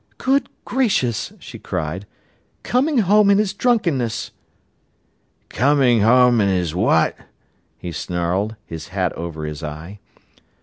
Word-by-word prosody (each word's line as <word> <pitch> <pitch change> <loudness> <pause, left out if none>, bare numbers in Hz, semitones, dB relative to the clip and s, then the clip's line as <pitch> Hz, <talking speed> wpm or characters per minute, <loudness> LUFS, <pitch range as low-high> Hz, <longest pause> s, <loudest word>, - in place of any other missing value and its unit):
"Good 275 +2 +1 0.2
gracious," 195 - 0
she - - -11
cried, 90 +2 -4 0.6
"coming 270 +4 +1
home 205 +2 +5
in 200 - +5
his 210 -2 0
drunkenness!" 170 - 0 1.2
"Comin' 130 -4 +3
home 120 +1 +5
in 100 - +2
his 90 -4 0
what?" 90 -3 +2 0.6
he 90 - -7
snarled, 90 +6 -2
his 80 -1 -8
hat 95 -2 -2
over 80 -2 -6
his 75 -1 -6
eye. 80 +6 -8
110 Hz, 120 wpm, -20 LUFS, -, 1.2 s, home